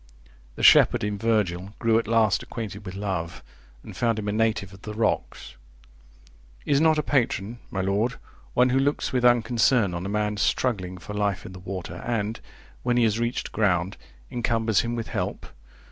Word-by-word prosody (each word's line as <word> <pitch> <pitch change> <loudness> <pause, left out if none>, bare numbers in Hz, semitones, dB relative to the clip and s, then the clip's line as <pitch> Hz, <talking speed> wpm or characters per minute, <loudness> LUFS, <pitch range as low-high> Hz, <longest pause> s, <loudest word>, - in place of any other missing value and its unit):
The - - -6
shepherd - - +6
in 105 -1 -2
Virgil 105 -4 0
grew 115 -1 +3
at 115 - -5
last 110 -3 +3
acquainted 105 -3 -7
with 90 - -6
Love, 95 -5 -4 0.4
and - - -10
found 115 -2 +1
him 105 -1 -4
a - - +1
native 110 -3 0
of 95 - -14
the 105 0 -7
rocks. 110 0 -2 1.1
Is 140 0 +3
not 160 -1 +4
a 150 - +1
patron 120 -5 0
my 95 - -2
lord, 100 +6 0 0.4
one 125 +1 +4
who 130 +1 +2
looks 140 0 0
with 125 -1 +1
unconcern 120 -3 +3
on 85 0 -4
a - - -4
man 105 0 -1
struggling 100 -5 0
for 105 +4 -8
life 105 -2 -1
in 95 - -8
the 90 - -10
water, 90 -2 -6
and, 110 +1 -2 0.4
when 120 0 +1
he 120 - +4
has 110 0 +2
reached 120 +1 -2
ground, 95 -3 +1 0.4
encumbers 115 -3 +1
him 120 0 -1
with 115 -1 -4
help? - - -3
110 Hz, 180 wpm, -25 LUFS, 100-120 Hz, 1.1 s, shepherd